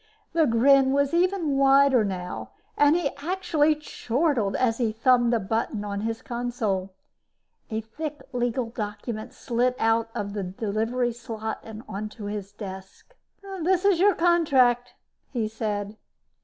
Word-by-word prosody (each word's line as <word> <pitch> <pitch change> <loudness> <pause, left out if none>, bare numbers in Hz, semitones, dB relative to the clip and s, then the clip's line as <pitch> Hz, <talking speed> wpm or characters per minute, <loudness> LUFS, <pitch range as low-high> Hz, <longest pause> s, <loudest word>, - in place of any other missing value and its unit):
The 325 -2 +3
grin 265 +3 +5
was 280 +2 +1
even 345 -5 +1
wider 275 -3 +5
now 180 -3 -5 0.2
and 290 +2 +5
he 340 -5 0
actually 315 -1 +1
chortled 265 -6 -1
as 235 -2 +1
he 230 -3 +1
thumbed 240 +2 +3
a 235 - +2
button 215 +1 -2
on 200 0 -3
his 225 +3 -3
console. 220 -6 -2 0.7
A 220 0 -2
thick 290 +5 -7
legal 245 0 0
document 220 +1 -5
slid 250 0 0
out 225 0 +2
of 200 -1 -3
the 205 - -3
delivery 220 +6 -1
slot 220 -2 -6 0.2
onto 210 +1 -6
his 205 -1 -5
desk. 195 - -10 0.5
"This 365 +3 +2
is 390 -4 +4
your 400 0 +5
contract," 270 -9 +3 0.3
he 230 -4 -1
said. 215 -1 -4
240 Hz, 135 wpm, -25 LUFS, 215-280 Hz, 0.7 s, grin